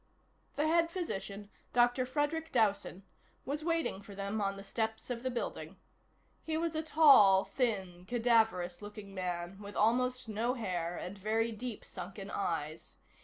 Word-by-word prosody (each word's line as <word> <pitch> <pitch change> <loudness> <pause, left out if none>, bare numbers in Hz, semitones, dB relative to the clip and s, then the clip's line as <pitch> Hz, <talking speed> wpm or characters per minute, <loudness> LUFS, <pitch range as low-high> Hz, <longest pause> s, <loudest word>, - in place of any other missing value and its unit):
The 300 +2 +1
head 335 +1 +3
physician, 205 - -5 0.2
Dr. 245 +1 +3
Frederic 305 +4 -1
Dowson, 205 -4 +1 0.4
was 290 +3 -3
waiting 330 - 0
for 200 0 -11
them 200 +2 -2
on 195 0 -1
the 195 - -8
steps 220 +3 -3
of 235 -1 -3
the 260 - -1
building. 240 -1 -4 0.7
He 315 -1 -1
was 330 0 -1
a 315 - +1
tall, 275 -12 +7
thin, 190 -8 -2
cadaverous 225 -7 +2
looking 205 -1 -9
man 180 0 -4
with 200 0 -9
almost 250 +3 +2
no 225 +4 0
hair 175 -7 -2
and 195 +3 -6
very 225 +3 +1
deep 225 +1 -6
sunken - - -7
eyes. - - -3
225 Hz, 150 wpm, -33 LUFS, 195-255 Hz, 0.7 s, tall